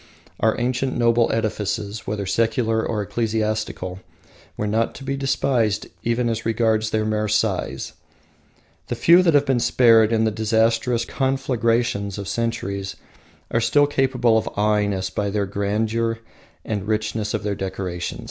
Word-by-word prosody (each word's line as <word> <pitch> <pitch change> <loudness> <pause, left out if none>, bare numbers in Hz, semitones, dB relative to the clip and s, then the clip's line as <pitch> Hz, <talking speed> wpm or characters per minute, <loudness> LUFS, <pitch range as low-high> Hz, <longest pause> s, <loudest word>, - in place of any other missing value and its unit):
Our 110 0 +2
ancient 125 +2 -1
noble 115 -1 +3
edifices, 105 -1 -2
whether 105 -1 -2
secular 110 +2 +1
or 105 -2 -2
ecclesiastical, 110 -3 -2 0.6
were 105 - -2
not 110 +2 0
to 135 - -9
be 135 0 -2
despised 130 -6 0 0.2
even 120 +1 0
as 115 -1 -2
regards 110 -1 +1
their 110 -1 0
mere 110 0 0
size. 100 -10 -1 0.9
The - - -2
few 170 +2 +6
that 165 -4 +3
have 145 0 +4
been 135 -3 +2
spared 115 -2 +5
in 110 -1 +2
the 110 - +2
disastrous 115 +2 +1
conflagrations 120 -7 0
of 100 -1 -5
centuries 100 -3 -3 0.6
are 115 - +1
still 145 +6 +4
capable 130 -5 +2
of - - -4
aweing 105 0 +2
us 95 -1 -3
by 100 -1 -1
the 100 0 -1
grandeur 110 +3 -1 0.5
and 105 -2 -3
richness 110 0 -1
of - - -4
their 105 -1 -1
decoration. 95 -3 -4
110 Hz, 150 wpm, -22 LUFS, 105-120 Hz, 0.9 s, few